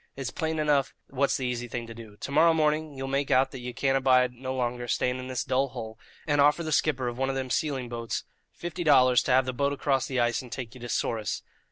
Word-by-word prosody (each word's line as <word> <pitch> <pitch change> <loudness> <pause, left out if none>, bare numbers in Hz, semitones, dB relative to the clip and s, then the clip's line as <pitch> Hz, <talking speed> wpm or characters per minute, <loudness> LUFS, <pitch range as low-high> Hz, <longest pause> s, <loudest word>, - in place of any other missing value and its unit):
It's 135 -2 -4
plain 160 -1 -2
enough 145 -3 +1 0.2
what's 140 +1 +1
the 130 - -3
easy 120 -1 -2
thing 120 0 -4
to 115 - -9
do. 110 -2 -12
To - - -5
morrow 160 +3 +5
morning 155 -1 +1
ye'll 135 0 -4
make 135 +1 -1
out 130 +1 +3
that 135 - -7
ye 125 0 -5
can't 135 +2 0
abide 130 -2 +3
no 130 +2 -6
longer 120 -1 -2
staying 125 +2 0
in 130 - -6
this 130 -2 -2
dull 130 +1 +1
hole, 110 -2 -8 0.3
and 145 -2 +2
offer 150 +4 +4
the 155 - -3
skipper 140 -4 +1
of 120 +1 -4
one 135 0 +1
of 135 - -1
them 130 -1 -3
sealing 135 -4 -1
boats 115 -1 -4 0.3
fifty 175 +1 -5
dollars 130 -5 +5
to - - -1
have 130 0 +4
the 130 - -3
boat 140 +2 0
across 135 -2 0
the 130 -2 -1
ice 120 0 +1
and 125 -2 -12
take 125 -3 -6
you 130 - -13
to 120 - -7
Souris. 110 -3 -1
130 Hz, 255 wpm, -27 LUFS, 125-140 Hz, 0.3 s, morrow